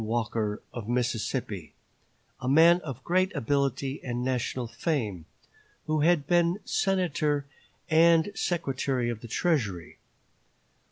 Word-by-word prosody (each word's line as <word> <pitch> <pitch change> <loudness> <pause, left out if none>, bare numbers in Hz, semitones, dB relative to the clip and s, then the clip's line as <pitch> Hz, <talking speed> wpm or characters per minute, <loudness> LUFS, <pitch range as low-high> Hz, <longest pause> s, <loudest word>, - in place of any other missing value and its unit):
Walker, 110 -2 -2
of 115 -2 -6
Mississippi, 120 -3 -2 0.6
a 130 - -2
man 165 +5 +6
of 135 -5 -7
great 185 +3 +1
ability 140 +1 -1
and 120 -1 -3
national 125 -1 -1
fame, 115 - -2 0.6
who 155 -1 0
had 155 -1 +3
been 175 +2 +2
Senator 155 -7 0 0.4
and 165 +2 +4
Secretary 135 - -1
of 115 -2 -7
the 120 - -8
Treasury. 110 - -1
135 Hz, 110 wpm, -28 LUFS, 120-165 Hz, 0.6 s, man